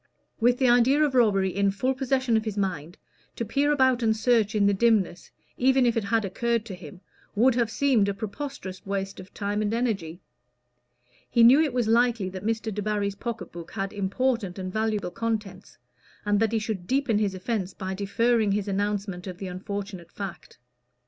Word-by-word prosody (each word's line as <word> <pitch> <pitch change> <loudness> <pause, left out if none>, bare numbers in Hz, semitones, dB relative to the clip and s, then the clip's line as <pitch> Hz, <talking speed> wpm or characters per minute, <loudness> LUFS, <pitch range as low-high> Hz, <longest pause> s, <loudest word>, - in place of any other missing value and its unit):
With 245 +1 +3
the 260 - +2
idea 245 +5 +4
of 290 -3 +1
robbery 195 -7 +3
in 200 0 +2
full 230 +7 0
possession 260 -2 0
of 220 - +2
his 215 -2 -4
mind, 175 -3 -3 0.4
to 230 - -3
peer 280 +7 +1
about 260 -3 +3
and 220 -1 +2
search 220 -2 +2
in 205 -1 +3
the 200 - +4
dimness, 200 -4 +1 0.3
even 260 0 +3
if 235 - +2
it 225 -3 -1
had 220 +1 +1
occurred 230 +3 -1
to 210 - -7
him, 180 +1 -11 0.3
would 245 +5 +4
have 235 -2 +1
seemed 230 -5 +2
a - - -1
preposterous 215 -1 -6
waste 195 0 -4
of 185 +1 -11
time 205 0 -2
and 215 +1 0
energy. 195 -9 -2 1.1
He 235 -1 +4
knew 260 +6 +8
it 310 -3 +1
was 240 -2 0
likely 230 -3 +2
that 185 0 -7
Mr. 220 0 -2
Debarry's 205 0 -1
pocket 230 +2 -6
book 170 0 -10
had 195 -1 -3
important 205 0 -1
and 185 -1 -5
valuable 215 -4 -1
contents, 215 -4 -4 0.5
and 205 0 +2
that 225 0 +2
he 230 - +1
should 215 -5 -4
deepen 260 -5 +1
his 200 -3 0
offence 190 -1 -3
by 190 0 -4
deferring 215 +2 +1
his 205 0 -1
announcement 200 -2 -2
of 180 -1 -6
the 195 - -6
unfortunate 195 -1 -6
fact. 195 -4 -8
215 Hz, 190 wpm, -26 LUFS, 195-235 Hz, 1.1 s, knew